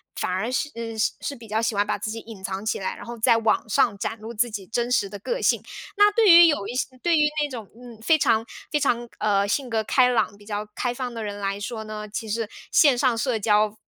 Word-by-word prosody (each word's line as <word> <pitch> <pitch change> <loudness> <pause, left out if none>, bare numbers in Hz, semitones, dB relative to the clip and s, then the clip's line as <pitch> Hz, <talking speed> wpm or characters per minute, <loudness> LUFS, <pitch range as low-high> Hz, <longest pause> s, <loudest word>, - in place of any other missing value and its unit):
反 - - -2
而 190 +6 -1
是 290 - -1
嗯， 230 -1 -6
是 240 +5 -2
比 230 -3 -13
较 215 +1 0
喜 225 -1 -1
欢 205 +1 +2
把 - - -1
自 210 +2 -4
己 225 - -5
隐 220 -3 -11
藏 195 +2 -4
起 220 - -1
来， 190 - -3
然 - - -10
后 235 0 -7
在 225 - +4
网 220 -1 +1
上 260 -3 +2
展 225 +3 -3
露 220 +2 -8
自 240 +2 +1
己 205 -4 -6
真 240 +3 -2
实 230 -5 +2
的 205 - -8
个 480 - -3
性， - - +2 0.4
那 415 0 +7
对 440 -2 +4
于 340 0 +9
有 290 -11 0
一 - - -4
些， 255 - 0 0.2
对 340 -2 +3
于 300 - +4 0.2
那 290 - -2
种， 230 -6 -8
嗯， 240 -1 -12
非 315 +7 +4
常 230 -5 +2 0.3
非 300 - +1
常， 240 -4 0
呃， 200 -1 +2
性 255 +5 -1
格 225 -1 0
开 250 +3 +4
朗， 230 -3 0
比 205 - -18
较 210 0 -4
开 245 -1 -1
放 250 -1 -5
的 230 - -5
人 205 -1 -5
来 195 0 -2
说 220 +1 -5
呢， 215 0 -7
其 220 +1 -5
实 225 +1 -2 0.2
线 280 -5 +5
上 245 -2 +2
社 240 -1 0
交 210 0 +2
225 Hz, 280 characters per minute, -24 LUFS, 210-250 Hz, 0.4 s, 于